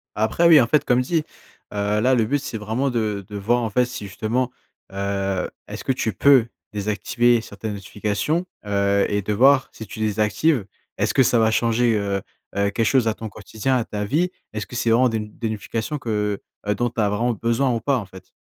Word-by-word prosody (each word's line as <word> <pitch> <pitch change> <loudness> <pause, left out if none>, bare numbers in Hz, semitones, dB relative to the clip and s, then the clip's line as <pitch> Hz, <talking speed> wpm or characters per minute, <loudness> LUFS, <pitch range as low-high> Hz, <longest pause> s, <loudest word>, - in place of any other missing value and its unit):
Après 110 +11 +2
oui, 160 -3 +8
en 115 - +2
fait 145 +4 +3
comme 125 +1 +3
dis, 155 +5 0 0.5
heu, 105 +1 0
là 130 +3 +4
le 115 -3 +2
but 145 +6 0
c'est 135 -4 -5
vraiment 110 +6 -1
de 105 -5 -2
de 105 -1 -6
voir 120 +5 +1
en 115 - -1
fait 125 +4 +2
si 120 -4 -7
justement, 115 +6 -1 0.4
heu, 100 -1 -2 0.2
est-ce - - -7
que - - +1
tu 115 -4 -1
peux, 130 +3 +5 0.3
désactiver 115 +3 +1
certaines 105 -1 -6
notifications? 105 - -2 0.2
Heu, 100 0 +2
et 100 0 0
de 105 +2 -2
voir 135 +5 +5
si 110 - -9
tu - - -9
désactives, 110 +5 +1 0.3
est-ce - - 0
que 135 - +5
ça 120 -1 +3
va 110 0 +3
changer, 115 +1 +2
heu 100 -1 -1 0.3
heu, 100 0 +2
quelque 115 - 0
chose 125 0 +3
à 110 - +2
ton 110 0 -7
quotidien, 130 +5 -2
à 120 - -1
ta 105 -1 -4
vie? 165 - +1 0.2
Est-ce 110 0 -3
que - - -9
c'est 120 -1 0
vraiment 125 +3 +4
des 115 - -1
n 105 -1 -5
des 115 -2 -2
notifications 110 +6 -3
que, 105 -4 -1 0.3
heu, 105 - +1
dont 120 +4 0
tu 115 - -7
as 105 - +2
vraiment 115 +4 0
besoin 115 +4 +1
ou 115 - -2
pas, 140 +3 +1
en 110 - -4
fait? 95 0 -14
110 Hz, 220 wpm, -22 LUFS, 105-125 Hz, 0.5 s, oui